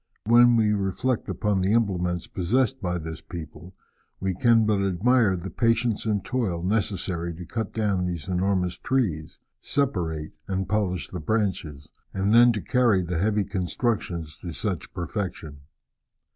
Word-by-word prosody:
When 120 +2 +6
we 110 -2 +3
reflect 105 +5 -1
upon 105 -2 0
the 95 +3 +2
implements 90 -6 0
possessed 125 +8 0
by 90 -2 -1
this 80 -1 -6
people, 85 +1 -9 0.4
we 95 0 -1
can 115 +3 +4
but 105 -2 +2
admire 100 +2 +3
the 90 +1 -6
patience 115 +1 +1
and 100 -3 0
toil 95 -10 -1
necessary 90 -4 -1
to 90 +2 -8
cut 110 +5 -4
down 100 -5 0
these 85 -5 -4
enormous 90 -1 0
trees, 95 - -1 0.2
separate 85 - -1 0.2
and 95 -1 -2
polish 95 -8 -1
the 90 - -5
branches, 80 -7 -2 0.3
and 100 +2 +1
then 120 +1 +7
to 105 - -4
carry 120 -7 +3
the 85 -1 -2
heavy 105 +2 +2
constructions 90 -4 -2
to 85 -2 -6
such 100 -3 -3
perfection. 85 -4 -5
95 Hz, 145 wpm, -25 LUFS, 90-110 Hz, 0.4 s, then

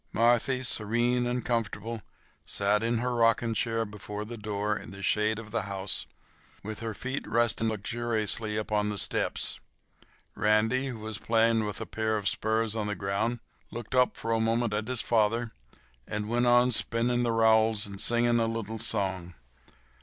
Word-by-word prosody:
Marthy, 120 +3 +2
serene 120 +2 +1
and 120 0 -2
comfortable, 115 -1 -2 0.4
sat 100 +1 +1
in 115 +1 0
her 125 +2 -1
rocking 115 0 +2
chair 115 0 0
before 105 0 -7
the 120 +2 -7
door 105 -1 -2
in - - -8
the 100 +1 -9
shade 105 +2 +2
of 110 -1 -9
the 115 - 0
house, 95 0 +1 0.6
with 110 +1 -6
her 115 -2 -4
feet 130 +2 -4
resting 115 0 +2
luxuriously 110 0 -1
upon 105 -1 0
the 105 - -3
steps. - - 0 0.7
Randy, 110 +5 +2
who 125 -3 -5
was 110 -1 -5
playing 115 -1 +2
with 105 - -4
a - - -4
pair 110 -1 -1
of 100 -2 -3
spurs 110 +1 0
on 105 -2 -1
the 105 - -2
ground, 100 +5 -2 0.3
looked 120 +1 -7
up 125 -1 +3
for 115 - -3
a 115 - +2
moment 115 0 +1
at 105 +1 -2
his 130 -2 0
father 115 +1 +1 0.6
and 105 0 -3
went 120 +2 +1
on 120 +1 +5
spinning 120 +2 +1
the 120 -1 +1
rowels 110 -1 +3
and 100 0 -5
singing 120 0 +3
a 115 - +1
little 115 -1 -4
song. 95 -5 0
115 Hz, 170 wpm, -28 LUFS, 105-120 Hz, 0.7 s, on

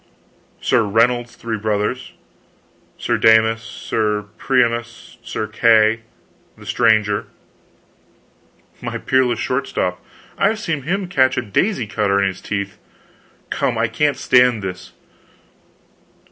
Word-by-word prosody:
" - - -36
Sir 125 - +4
Reynold's 120 +3 +1
three 115 -2 -4
brothers, 105 +4 -2 0.8
Sir - - -1
Damus, 110 0 +4
Sir 105 -2 -2
Priamus, 120 -3 -1
Sir 110 - -4
Kay 110 0 +3 0.6
the - - -14
Stranger 110 -3 +2 0.8
" - - -35
"My - - -4
peerless 130 -3 +1
short 125 +5 -2
stop! 90 0 -2 0.4
I've 215 +3 +2
seen 165 -9 -2
him 185 +7 -2
catch 130 -6 +2
a - - 0
daisy 125 - 0
cutter 100 -1 0
in 100 - +2
his 95 - -9
teeth. 100 -1 -4 0.7
Come, - - 0
I - - +2
can't 150 -1 0
stand 125 -4 +3
this!" 90 -1 -6
115 Hz, 120 wpm, -19 LUFS, 105-125 Hz, 0.8 s, Sir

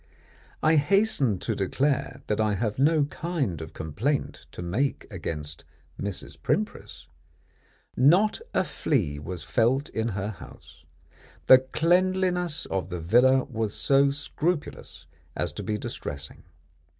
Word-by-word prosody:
I 155 +1 +5
hasten 145 - +2
to - - -2
declare 130 +8 -1
that 105 0 0
I 105 -1 +1
have 105 +2 -2
no 150 +2 +4
kind 140 - -3
of 80 - -8
complaint 105 - -2
to - - -7
make 115 +11 -1
against 80 -5 -5 0.4
Mrs. 100 -2 -6
Primpris. - - -2 0.9
Not 180 - +4
a - - +2
flea 85 - -1
was 85 +1 -6
felt 120 +10 +1
in 110 0 -2
her 100 +2 -2
house. 95 -5 -12 0.6
The 130 - +9
cleanliness 180 +3 +1
of 95 -1 -3
the 90 -1 -4
villa 125 +10 +4
was 110 -4 -3
so 140 0 +3
scrupulous 145 +3 -3 0.3
as - - -2
to - - -6
be 105 -1 -2
distressing. 70 -7 -7
125 Hz, 125 wpm, -26 LUFS, 95-150 Hz, 0.9 s, The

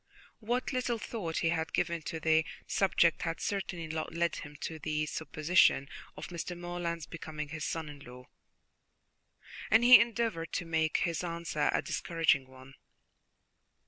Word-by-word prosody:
What 240 +5 -1
little 250 -2 0
thought 200 -7 -4
he 165 - +2
had 160 -1 -1
given 170 -1 0
to 160 - -4
the 160 0 +3 0.2
subject 175 -4 +2
had 165 -1 -2
certainly 190 -4 -3
not 160 0 -4
led 170 -1 0
him 145 0 -9
to 160 -1 -4
the 155 0 -1
supposition 155 -2 +2 0.3
of - - -7
Mr. 175 0 -5
Morland's 175 -2 -3
becoming 155 -2 -6
his 155 0 -4
son 165 -2 -3
in 145 -1 -9
law, 125 -1 -12 1.4
and 220 +2 +5
he 245 -2 +10
endeavoured 230 -8 -1
to 175 - -2
make 160 -1 +1
his 170 0 -2
answer 170 -3 -1
a - - 0
discouraging 165 -5 +1
one. 130 +1 -14
165 Hz, 150 wpm, -31 LUFS, 155-175 Hz, 1.4 s, he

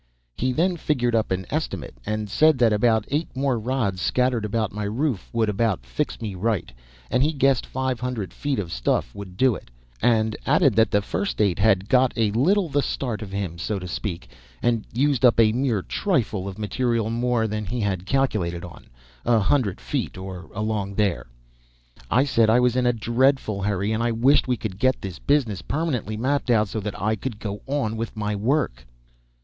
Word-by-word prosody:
He 130 +1 0
then 175 +6 +1
figured 125 -7 0
up 110 -1 +1
an 95 0 -2
estimate, 100 - -3
and 110 0 -2
said 155 +8 +4
that 115 -3 +4
about 110 0 +2
eight 150 +4 0
more 130 -3 0
rods 110 -6 -1
scattered 125 -2 +1
about 110 0 -1
my 105 0 -3
roof 120 +1 -2
would 115 -1 +1
about 105 - 0
fix - - -3
me 105 -3 -4
right, 95 - -1 0.4
and 125 - +2
he 150 +3 +3
guessed 135 -4 +2
five 130 -2 -2
hundred 125 -6 -4
feet 145 -2 -2
of 90 -5 -3
stuff - - 0
would 95 -2 -9
do 130 +1 +4
it; - - -9 0.3
and 110 -2 +2
added - - +4
that 110 -2 +4
the 100 0 +1
first 95 +2 -3
eight 100 -3 +2
had 100 -2 +3
got 130 +1 +3
a 110 -3 +1
little 175 - +2
the 145 -1 +1
start 120 -6 -3
of 105 -3 -7
him, 95 -4 -4
so 105 +4 -2
to 90 -1 -6
speak, 85 0 -4 0.3
and 115 -2 0
used 135 0 +1
up 120 -2 +5
a 110 -2 +6
mere 120 -5 0
trifle 110 - -1
of 95 - -6
material 115 +1 -1
more 120 -1 +1
than 105 0 -2
he 115 +5 -3
had 95 -2 -2
calculated 100 -11 0
on 85 - -13 0.4
a 120 - +3
hundred 110 -1 +1
feet - - -3
or 95 -1 -8
along 105 -2 -2
there. 100 - 0 0.8
I 130 - +4
said 115 -5 +3
I 115 +3 +5
was 125 -1 +2
in 125 -1 +2
a - - +5
dreadful 120 -2 +1
hurry, 100 +1 0
and 110 +1 0
I 120 0 +1
wished 130 +6 +3
we 125 -1 +1
could 100 -3 -5
get 130 +2 +2
this 95 -3 -7
business 120 - +1
permanently 130 - -2
mapped 135 +3 0
out, 110 -4 +3
so 110 - -3
that 105 -1 -5
I 110 +2 +1
could 110 0 -5
go 105 -2 -5
on 135 -6 -1
with 115 0 -5
my 105 0 -1
work. 115 - -1
110 Hz, 200 wpm, -24 LUFS, 100-130 Hz, 0.8 s, a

